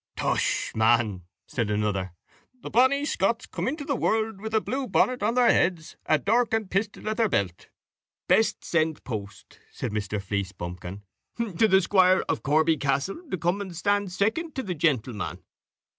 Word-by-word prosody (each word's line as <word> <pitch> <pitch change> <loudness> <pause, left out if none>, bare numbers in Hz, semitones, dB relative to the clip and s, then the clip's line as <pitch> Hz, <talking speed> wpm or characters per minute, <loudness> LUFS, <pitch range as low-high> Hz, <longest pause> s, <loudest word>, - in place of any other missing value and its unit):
"Tush, - - 0
man," 110 -5 +2 0.2
said 115 -4 -2
another, 105 -3 -1 0.5
"the - - -6
bonny 260 +5 +4
Scots 230 -1 0
come - - -4
into 285 +2 -3
the 280 - 0
world 220 -4 0
with 220 0 -5
the 220 - +4
blue 265 +4 -3
bonnet 255 +1 +2
on 220 +3 +1
their 245 -1 +5
heads, 175 -3 0
and 155 - +2
dirk 225 +2 +3
and 215 -4 -3
pistol 205 +2 -2
at 215 - -1
their 225 -2 +2
belt." 95 - -1 0.6
"Best 220 - +2
send 160 -2 0
post," 100 -4 -7
said - - -4
Mr. 105 0 -2
Fleecebumpkin, 95 -1 -5 0.5
"to 220 +6 +4
the 190 -1 +5
squire 185 0 +4
of 160 - -1
Corby 155 +3 +3
Castle, 140 - -1
to 185 - -2
come 175 +4 0
and 190 -3 -7
stand 205 +1 0
second 225 - -1
to 265 - -2
the 185 - -3
gentleman." 130 - -1
180 Hz, 170 wpm, -26 LUFS, -, 0.6 s, their